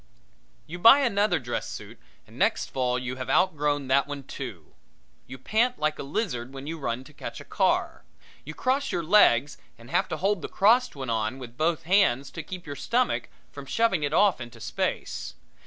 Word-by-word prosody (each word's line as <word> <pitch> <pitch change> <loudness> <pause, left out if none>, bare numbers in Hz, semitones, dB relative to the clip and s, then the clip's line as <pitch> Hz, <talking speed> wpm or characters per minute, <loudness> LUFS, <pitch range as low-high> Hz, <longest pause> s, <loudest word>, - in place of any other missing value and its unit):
You 175 +3 -8
buy 230 +9 +8
another 205 -7 +2
dress 120 -4 -4
suit - - -9 0.3
and - - -18
next - - 0
fall 125 -1 0
you 125 0 -4
have 130 - -5
out 185 -3 +3
grown 145 -2 0
that 140 +1 +3
one 145 -1 -6
too. 115 - -8 0.5
You 130 - -8
pant 230 - +1
like 155 0 -1
a - - -2
lizard 140 - -3
when 135 +1 -7
you 160 +2 -5
run 125 -2 -3
to 150 - -16
catch - - -7
a - - -11
car. - - 0 0.4
You 155 +2 -8
cross 270 +2 0
your 170 - -1
legs 145 - +4 0.2
and 115 +1 -14
have - - +2
to 160 - -4
hold 195 +2 0
the - - -5
crossed 240 +3 +3
one 130 -4 -4
on 110 +3 -1
with 125 -3 -10
both 160 +3 0
hands 165 -7 +2
to 165 - -6
keep 180 +3 -8
your 145 -2 -6
stomach 245 - 0 0.2
from - - -10
shoving 225 -7 +1
it 145 - -1
off 195 -10 +3
in 120 0 -7
space. - - -3
150 Hz, 200 wpm, -26 LUFS, 130-195 Hz, 0.5 s, buy